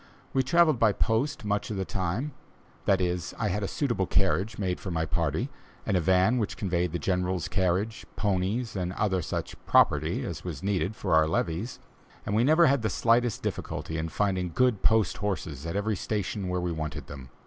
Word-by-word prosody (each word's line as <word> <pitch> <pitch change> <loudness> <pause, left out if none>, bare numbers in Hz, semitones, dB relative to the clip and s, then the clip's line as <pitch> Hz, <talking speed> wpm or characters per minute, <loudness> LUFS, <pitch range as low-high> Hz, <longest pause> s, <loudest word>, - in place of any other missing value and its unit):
We 135 - +3
travelled 155 0 +4
by 110 -3 +4
post 115 +5 0
much 105 +4 -1
of 105 - -3
the 95 - -1
time 95 - -2 0.5
that 95 -1 +4
is, 90 -1 -2
I 105 -1 0
had 105 - -1
a 100 - -1
suitable 120 - -1
carriage 95 +2 +1
made 95 -3 -1
for 95 - -6
my 80 -2 0
party, - - -1 0.3
and - - +1
a - - +4
van 95 +8 +3
which 105 - -2
conveyed 90 -3 0
the 85 - -1
General's 90 +1 -1
carriage, 95 +4 0
ponies, 105 +4 -1
and 90 -1 -2
such - - -12 0.6
other - - -14
"property" - - +3
as - - -5
was - - -6
needed 100 0 0
for 95 -5 -1
our 80 0 +5
levees, 85 +8 -1 0.5
and 105 - -1
we 115 - +4
never 160 +5 +6
had 140 -4 +3
the 110 - 0
slightest 115 +3 +2
difficulty 80 - -4
in 80 +1 -2
finding 95 0 0
good 125 0 +2
post 110 -2 +3
horses 85 -7 -3
at 85 - -4
every 105 +1 0
station 100 -1 -2
where 90 0 -1
we 90 -1 -1
wanted 80 -2 -4
them. 65 -3 -10
95 Hz, 195 wpm, -28 LUFS, 90-110 Hz, 0.6 s, never